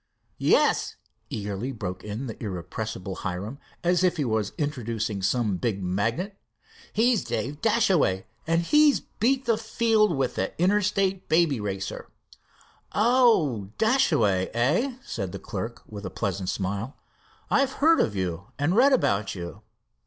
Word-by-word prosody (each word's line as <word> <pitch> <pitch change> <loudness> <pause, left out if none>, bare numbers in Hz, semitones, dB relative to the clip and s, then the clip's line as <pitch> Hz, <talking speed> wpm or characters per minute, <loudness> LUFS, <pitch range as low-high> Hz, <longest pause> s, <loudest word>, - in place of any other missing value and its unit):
"Yes," - - +3 0.3
eagerly 105 +4 -3
broke 95 -6 -5
in 105 +5 -5
the 115 -1 -7
irrepressible 95 0 -5
Hiram, 100 +9 -4 0.2
as 180 +1 +2
if 180 -1 +2
he 145 - 0
was 110 -4 0
introducing 115 -8 -2
some 105 0 +1
big 100 -2 -2
magnate, 115 - -1 0.6
"he's 230 0 +2
Dave 145 +4 -3
Dashaway, 185 - +2 0.2
and 165 +1 +2
he's 300 - +5
beat 265 +3 0
the 230 -2 +2
field 220 -5 +2
with 130 -2 0
the - - -3
Interstate 195 0 +1
Baby 160 -6 +3
Racer." 95 -1 -4 0.8
"Oh, 210 - +3
Dashaway, 150 - +2
eh?" 170 - +1
said 95 -5 -4
the - - -4
clerk, 115 +4 -6
with 105 -1 -9
a 95 - -4
pleasant 95 -1 -3
smile. 100 +6 -3 0.5
"I've 275 -1 +3
heard 325 +3 +4
of 105 - +1
you 95 0 -3
and 145 +6 +1
read 270 +4 +6
about 100 - +1
you." 85 -3 -7
125 Hz, 140 wpm, -26 LUFS, -, 0.8 s, read